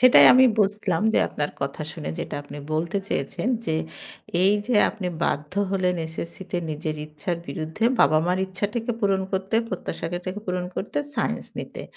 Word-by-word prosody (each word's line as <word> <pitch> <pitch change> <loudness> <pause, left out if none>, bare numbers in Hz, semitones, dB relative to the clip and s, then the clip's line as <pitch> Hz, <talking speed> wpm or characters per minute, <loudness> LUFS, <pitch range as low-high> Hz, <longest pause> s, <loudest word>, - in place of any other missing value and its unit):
সেটাই 255 0 +9
আমি 255 +1 +8
বুঝলাম। 200 -4 +2
যে, - - +5
আপনার 145 0 -2
কথা 140 +3 -2
শুনে 75 - -5
যেটা - - -4
আপনি 145 - -9
বলতে 170 +5 0
চেয়েছেন 140 - -1 0.2
যে, 160 - +1 0.7
এইযে 205 +5 +3 0.2
আপনি 195 -4 -4 0.2
বাধ্য 150 +2 -1 0.2
হলেন 185 -2 +2
এসএসসিতে 170 +3 -6
নিজের 155 0 -3
ইচ্ছার 155 +3 -3
বিরুদ্ধে 160 +6 -3 0.2
বাবা-মার 170 +4 +4
ইচ্ছাটাকে 210 +5 -2
পূরণ 195 -2 +2
করতে, 190 +3 -1
প্রত্যাশাটাকে 180 +2 -4
পূরণ 180 0 -1
করতে। 210 - -2 0.2
সায়েন্স - - -1
নিতে। - - -6
180 Hz, 145 wpm, -25 LUFS, 160-205 Hz, 0.7 s, সেটাই